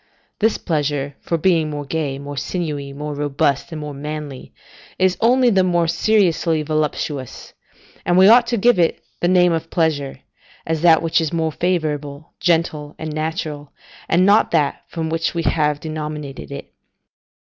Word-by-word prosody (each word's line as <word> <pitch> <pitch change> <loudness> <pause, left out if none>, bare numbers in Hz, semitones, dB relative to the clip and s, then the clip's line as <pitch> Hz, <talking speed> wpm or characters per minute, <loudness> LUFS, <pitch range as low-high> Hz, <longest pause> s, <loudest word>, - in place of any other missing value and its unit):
This 220 +1 +2
pleasure, 145 -3 -2
for 170 - -2
being 165 -2 +2
more 145 -1 -5
gay, 145 -2 -2
more 140 +1 -7
sinewy, 145 -2 -3
more 150 +2 -5
robust 145 +1 -1
and 160 - -5
more 150 -1 -6
manly, 150 -1 -7 0.5
is 185 0 +2
only 245 +1 +4
the 190 -2 +3
more 175 -2 +1
seriously 170 -4 +2
voluptuous, 150 -3 -3 0.5
and 175 - +2
we 190 +1 +7
ought 235 +2 +6
give 240 -3 +4
it 170 - +2 0.2
the 175 - +1
name 180 -1 +4
of 165 0 -3
pleasure, 145 -5 -1 0.4
as 160 -1 -1
that 165 -2 +5
which 165 0 +2
is 160 - -2
more 160 -1 0
favourable, 155 -3 -2
gentle, 160 -4 0
and 155 -1 -5
natural, 155 -2 -4 0.4
and 180 +3 +4
not 205 +2 +4
that 150 -4 0
from 165 -1 -4
which 165 +1 -1
we 165 - -1
have 150 -3 +1
denominated 150 -3 -6
it. 140 - -8
160 Hz, 160 wpm, -20 LUFS, 145-175 Hz, 0.5 s, we